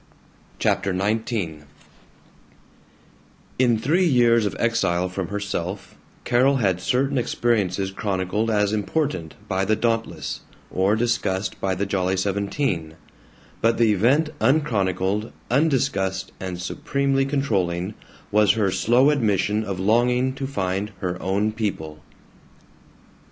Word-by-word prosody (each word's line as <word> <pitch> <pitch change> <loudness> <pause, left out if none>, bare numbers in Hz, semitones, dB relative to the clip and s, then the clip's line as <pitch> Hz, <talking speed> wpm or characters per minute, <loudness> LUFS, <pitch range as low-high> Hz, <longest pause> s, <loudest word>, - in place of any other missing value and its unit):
CHAPTER 95 -2 0
XIX 110 +5 -1
I 80 -9 -3 1.9
IN 120 -3 +4
three 165 +11 +2
years 120 -5 +4
of - - -4
exile 95 -7 +1
from 90 -1 -4
herself 100 -2 -4 0.3
Carol 130 +3 +3
had 95 -8 +1
certain 135 +5 +1
experiences 100 -6 0
chronicled 100 +2 -1
as 105 -1 +1
important 105 - -2
by 95 -1 0
the 110 +3 +2
Dauntless, 115 -10 -2 0.3
or 95 +3 +2
discussed 110 -4 -1
by 95 -1 0
the 100 +2 -1
Jolly 95 -1 0
Seventeen, 100 - -1 0.7
but 115 0 +3
the 115 -2 +4
event 135 - +2
unchronicled, 105 - +1 0.2
undiscussed, 120 - +1
and 90 -2 -5
supremely 135 +8 0
controlling, 100 -10 -1 0.4
was 105 -1 +4
her 105 -4 +1
slow 120 +8 +4
admission 105 -5 +1
of 100 -3 -4
longing 125 +5 +2
to 135 0 -4
find 100 -4 -2
her 90 -1 -3
own 100 +3 0
people. 80 -9 -4
105 Hz, 115 wpm, -23 LUFS, 95-120 Hz, 1.9 s, IN